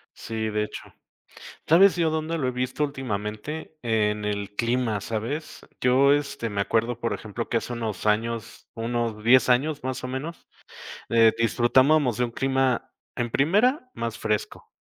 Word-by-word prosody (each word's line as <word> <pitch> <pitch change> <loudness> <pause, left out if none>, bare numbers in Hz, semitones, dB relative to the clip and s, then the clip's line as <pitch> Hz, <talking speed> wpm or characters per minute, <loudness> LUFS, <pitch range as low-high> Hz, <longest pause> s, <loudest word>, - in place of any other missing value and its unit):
Sí, 110 -1 -4
de 105 0 0
hecho. - - -8 0.9
¿Sabes 185 +4 +6
yo 165 -2 +1
dónde 160 +1 -2
lo 135 -5 -1
he - - 0
visto 125 +3 -2
últimamente? 135 +3 -4
En 105 -3 0
el 100 -1 -3
clima, 115 -2 0
¿sabes? 115 +10 -4 0.2
Yo, 135 +3 +5
este, 140 -5 -2
me 100 -1 -1
acuerdo, 115 +3 0
por 115 - -1
ejemplo, 110 +2 -5
que 115 - +2
hace 120 - -4
unos 110 -5 -4
años, 115 +1 -1
unos 115 -2 -2
10 125 +2 +5
años, 145 +4 +2
más 130 0 -4
o - - -3
menos, 135 +6 -6 0.6
eh, 115 -1 +5
disfrutábamos 125 +3 +3
de 125 - +2
un 120 - -4
clima, 130 0 0 0.2
en 120 -2 -2
primera, 220 - +2
más 115 0 -4
fresco. 105 -2 -3
120 Hz, 160 wpm, -25 LUFS, 110-140 Hz, 0.9 s, Sabes